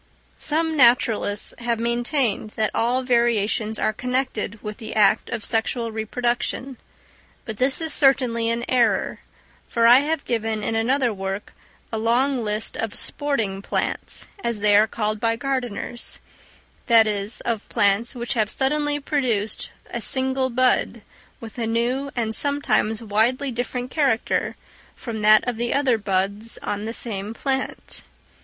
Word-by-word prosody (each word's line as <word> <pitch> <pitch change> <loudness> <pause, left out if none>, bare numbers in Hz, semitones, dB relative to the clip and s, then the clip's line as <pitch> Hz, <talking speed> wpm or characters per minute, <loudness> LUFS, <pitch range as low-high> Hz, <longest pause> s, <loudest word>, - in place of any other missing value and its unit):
Some 320 +1 0
naturalists 235 -5 +3
have 235 -1 -1
maintained 235 -1 0
that 215 -1 +1
all 245 +3 +1
variations 225 -3 +1
are 215 - 0
connected 250 -3 -2
with 210 0 -6
the 220 -1 -7
act 205 -2 +3
of 230 -3 -4
sexual 230 +1 0
reproduction; 240 +3 -2 0.7
but 220 -3 -6
this 260 +3 +1
is 320 -2 0
certainly 250 -5 +3
an 235 +1 -1
error; 235 -6 +1 0.5
for 230 -1 +1
I 240 +2 +8
have 300 +1 -2
given 225 -2 -2
in - - -1
another 240 +2 +1
work 195 +1 -5 0.4
a 220 - -2
long 245 +3 +1
list 210 +1 -2
of 225 -2 -3
"sporting 225 -10 -1
plants;" - - -1 0.2
as 235 -3 -2
they 205 -1 +4
are 210 +2 +6
called 215 -1 -2
by 230 +1 +1
gardeners; 245 -2 -3 0.7
that 230 -2 +7
is, 205 0 -1
of 230 -3 -3
plants 205 +5 +1
which 240 -1 -2
have 215 -3 0
suddenly 290 +3 0
produced 245 -8 -1 0.2
a - - -3
single 260 -1 +1
bud 245 -2 +1 0.4
with 230 +1 -9
a 230 - -1
new 245 +5 0
and 225 -2 -1
sometimes 280 -6 +1
widely 235 +6 +1
different 245 +1 -4
character 275 -7 0 0.4
from 225 -3 -6
that 215 +3 +5
of 245 -2 -1
the 240 +1 -1
other 265 -5 +2
buds 200 +3 -1
on 205 +1 -3
the 225 - -3
same 215 -2 -3
plant. 270 +1 -3
235 Hz, 145 wpm, -23 LUFS, 215-255 Hz, 0.7 s, I